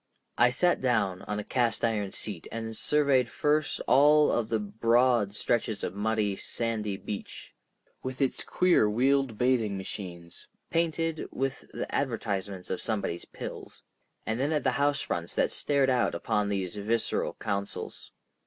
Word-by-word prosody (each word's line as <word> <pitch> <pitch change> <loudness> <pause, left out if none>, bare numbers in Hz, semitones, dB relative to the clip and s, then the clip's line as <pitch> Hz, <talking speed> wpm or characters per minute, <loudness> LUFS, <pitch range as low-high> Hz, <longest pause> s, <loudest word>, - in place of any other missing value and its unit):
I 120 +1 +7
sat 175 +8 +2
down 110 -8 +1
on 105 - -2
a 105 - -3
cast 120 0 +1
iron 105 -4 -1
seat, - - -4
and 115 0 -4
surveyed 140 -4 +3
first 150 +1 +1
of - - -7
all 145 -1 +5
the 110 +1 -1
broad 115 0 +2
stretches 110 -3 -1
of - - -2
muddy, 105 0 0
sandy 110 -2 -2
beach, 100 0 -7 0.5
with 130 0 -5
its 135 -2 0
queer 180 -12 +3
wheeled 130 +1 +2
bathing 120 -5 +2
machines, 90 -3 -8 0.2
painted 165 -1 0
with 135 0 -3
the - - -3
advertisements 100 -7 -2
of 95 - -2
somebody's 100 -6 -2
pills—and 110 +2 -8
then 140 +4 +1
at 150 -2 +1
the 130 - +3
house 140 +2 +1
fronts 85 0 -3
that - - +2
stared 140 -2 +2
out 125 -2 +2
upon 105 -2 0
these 95 -3 -2
visceral 110 +3 0
counsels. 100 -2 -4
115 Hz, 145 wpm, -28 LUFS, 105-135 Hz, 0.5 s, I